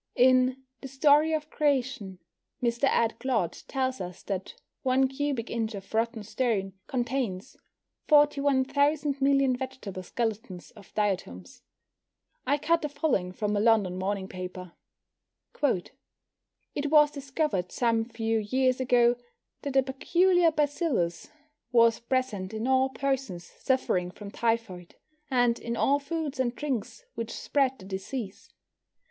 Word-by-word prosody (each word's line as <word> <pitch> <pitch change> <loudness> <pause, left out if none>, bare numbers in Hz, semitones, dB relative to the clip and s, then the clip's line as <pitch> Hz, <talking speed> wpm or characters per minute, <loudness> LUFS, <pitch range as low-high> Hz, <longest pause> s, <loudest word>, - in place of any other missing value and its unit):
In 255 +1 +4 0.2
The - - -6
Story 290 +3 +4
of 310 -1 -2
Creation 255 -10 0 0.4
Mr. 235 +2 +1
Ed. 230 -4 +1
Clodd 225 -10 -1
tells 260 -4 -1
us 180 -1 -7
that 190 -2 -4 0.3
one 265 +1 +3
cubic 270 -3 -3
inch 225 -2 -2
of 195 +1 -10
rotten 225 0 0
stone 205 -4 -1
contains 245 -6 -2 0.5
41 285 -3 +4
thousand 285 0 +1
million 275 -1 +3
vegetable 250 -7 -6
skeletons 215 -2 -4
of 205 -3 -16
diatoms. 180 - -2 0.9
I 285 +2 +3
cut 330 +3 +2
the 300 - -2
following 280 - 0
from 210 +3 -2
a - - +2
London 210 -4 +3
morning 195 0 -2
paper: 185 -1 -7 0.9
It 285 +4 -5
was 300 -1 +6
discovered 275 - -2
some 230 -2 +1
few 225 -1 -1
years 255 +4 +1
ago 245 -1 +3 0.4
that 280 -2 -4
a 270 - +5
peculiar 340 +6 +3
bacillus 290 - -1 0.4
was 230 -2 +5
present 235 -6 -2
in 220 +2 -3
all 260 0 +3
persons 265 -8 -2
suffering 185 -5 -1
from 200 +2 -10
typhoid, 225 -7 -2 0.3
and 245 -3 +2
in 235 0 -4
all 280 +5 +3
foods 290 -1 -4
and 245 -2 0
drinks 290 - -4
which 230 0 -5
spread 270 -2 0
the 190 - -13
disease. 195 +2 -6
250 Hz, 130 wpm, -28 LUFS, 210-275 Hz, 0.9 s, was